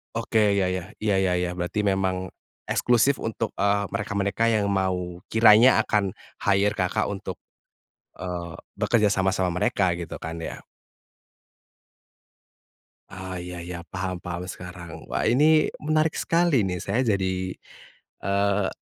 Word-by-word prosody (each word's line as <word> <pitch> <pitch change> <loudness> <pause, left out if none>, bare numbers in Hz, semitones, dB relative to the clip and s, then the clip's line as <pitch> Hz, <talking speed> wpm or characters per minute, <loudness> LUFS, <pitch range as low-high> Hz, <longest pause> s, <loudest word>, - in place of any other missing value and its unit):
Oke, 110 -3 +2
ya 95 -2 +1
ya, 90 -1 -4
iya, 105 -2 +2
ya 95 -2 +2
ya, 90 - -1
berarti 90 +4 -1
memang, 95 -2 0 0.4
eksklusif 125 +3 +3
untuk, 115 -1 -3
eee, 100 0 +1
mereka-mereka 100 +2 -1
yang 105 -3 +2
mau 90 -2 -1
kiranya 110 +2 +6
akan 100 -3 0 0.2
hire 100 +2 +1
Kakak 90 -2 0
untuk, - - -5 0.9
eee, 90 -2 -5 0.2
bekerja 105 -3 +2
sama 95 -1 +1
sama 95 -1 0
mereka, 90 -1 +1
gitu 85 -1 -7
kan 80 +1 -5
ya? - - -6 2.5
Oh, 95 -1 -7
iya 90 0 -6
iya, 90 0 -6
paham 95 0 -3
paham 90 +1 -5
sekarang. 90 -2 -9
Wah, - - 0
ini 150 +6 +4 0.2
menarik 155 +1 +1
sekali 165 -8 +2
nih, 90 -2 -2
saya 125 - -1
jadi, 95 -1 -1 0.7
eee, 100 0 +1
95 Hz, 130 wpm, -25 LUFS, 90-105 Hz, 2.5 s, kiranya